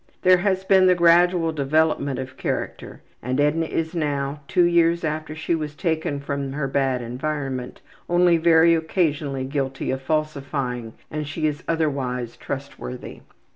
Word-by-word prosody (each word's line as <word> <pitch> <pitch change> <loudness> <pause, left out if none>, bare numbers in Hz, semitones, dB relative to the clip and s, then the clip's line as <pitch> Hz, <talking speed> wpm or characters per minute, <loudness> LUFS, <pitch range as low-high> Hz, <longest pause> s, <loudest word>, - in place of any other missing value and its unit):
There 185 0 +6
has 190 0 0
been 190 -1 +5
the 180 - +5
gradual 170 0 +4
development 145 -2 +1
of 130 0 -6
character, - - -4 0.2
and 130 +3 -2
Edna 150 +3 +2
is 160 +1 -2
now, 145 -3 -2
two 180 -2 +3
years 170 0 +3
after 155 0 -3
she 160 +2 -2
was 150 -2 -3
taken 160 -4 -1
from 140 -1 -4
her 140 -1 -2
bad 135 -2 0
environment, 130 0 -4 0.3
only 175 -1 +4
very 165 0 +5
occasionally 155 -5 0
guilty 135 0 -2
of 130 0 -3
falsifying, 140 -5 -2 0.2
and 150 -1 -3
she 155 +2 -3
is 150 0 -1
otherwise 135 -7 -1
trustworthy. 135 -2 -7
150 Hz, 145 wpm, -23 LUFS, 135-165 Hz, 0.3 s, There